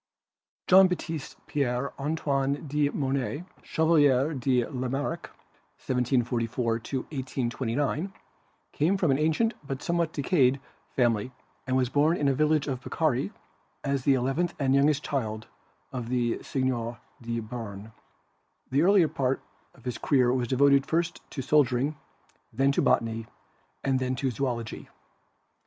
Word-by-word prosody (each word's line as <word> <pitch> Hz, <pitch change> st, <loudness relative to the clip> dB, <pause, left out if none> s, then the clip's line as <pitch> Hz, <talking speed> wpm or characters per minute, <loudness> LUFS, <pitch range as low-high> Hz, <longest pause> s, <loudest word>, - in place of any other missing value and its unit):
Jean 190 Hz, +1 st, +7 dB
Baptiste 165 Hz, -5 st, -4 dB
Pierre 135 Hz, -1 st, -1 dB
Antoine 140 Hz, -1 st, -1 dB
de 145 Hz, 0 st, +1 dB
Monet, 140 Hz, +2 st, -2 dB, 0.2 s
Chevalier 150 Hz, -3 st, +3 dB
de 125 Hz, -2 st, +1 dB
Lamarck 135 Hz, +6 st, -3 dB, 0.6 s
(1744 125 Hz, -2 st, 0 dB, 0.4 s
1829), 135 Hz, +4 st, -2 dB, 0.6 s
came 170 Hz, +7 st, +2 dB
of 195 Hz, -, -4 dB
an 140 Hz, -4 st, +3 dB
ancient 160 Hz, +10 st, +2 dB
but 135 Hz, -2 st, -5 dB
somewhat 170 Hz, -1 st, 0 dB
decayed 140 Hz, -4 st, +2 dB, 0.4 s
family 120 Hz, -1 st, +1 dB, 0.4 s
and 130 Hz, 0 st, +2 dB
was 130 Hz, -2 st, +1 dB
born 150 Hz, +5 st, +3 dB
in 145 Hz, -, +1 dB
a 135 Hz, -, +3 dB
village 155 Hz, +1 st, +2 dB
of 130 Hz, -3 st, -3 dB
Picardy 130 Hz, -11 st, 0 dB, 0.5 s
as 140 Hz, -2 st, -1 dB
the 135 Hz, 0 st, +4 dB
eleventh 135 Hz, +8 st, 0 dB
and 135 Hz, -2 st, +1 dB
youngest 145 Hz, +1 st, +3 dB
child 110 Hz, -6 st, -2 dB, 0.5 s
of 125 Hz, -3 st, -5 dB
the 120 Hz, -2 st, 0 dB
Seigneur 120 Hz, -3 st, -2 dB, 0.2 s
de 115 Hz, 0 st, -3 dB
Beam. 110 Hz, -2 st, -7 dB, 0.8 s
The 140 Hz, +3 st, +3 dB
earlier 185 Hz, -1 st, +5 dB
part 135 Hz, -2 st, 0 dB, 0.4 s
of -, -, -20 dB
his 125 Hz, -2 st, -3 dB
career 125 Hz, -4 st, +3 dB
was 125 Hz, -2 st, 0 dB
devoted 140 Hz, +2 st, +4 dB
first 170 Hz, +3 st, -1 dB
to 135 Hz, -, -5 dB
soldier 130 Hz, -3 st, +3 dB
ing, 145 Hz, +5 st, -1 dB, 0.6 s
then 135 Hz, +1 st, +2 dB
to -, -, +1 dB
Botany 115 Hz, -1 st, +1 dB, 0.6 s
and 135 Hz, -1 st, +1 dB
then 130 Hz, 0 st, -1 dB
to 130 Hz, 0 st, -1 dB
Zoology. 120 Hz, -2 st, -3 dB
135 Hz, 135 wpm, -27 LUFS, 125-150 Hz, 0.8 s, Jean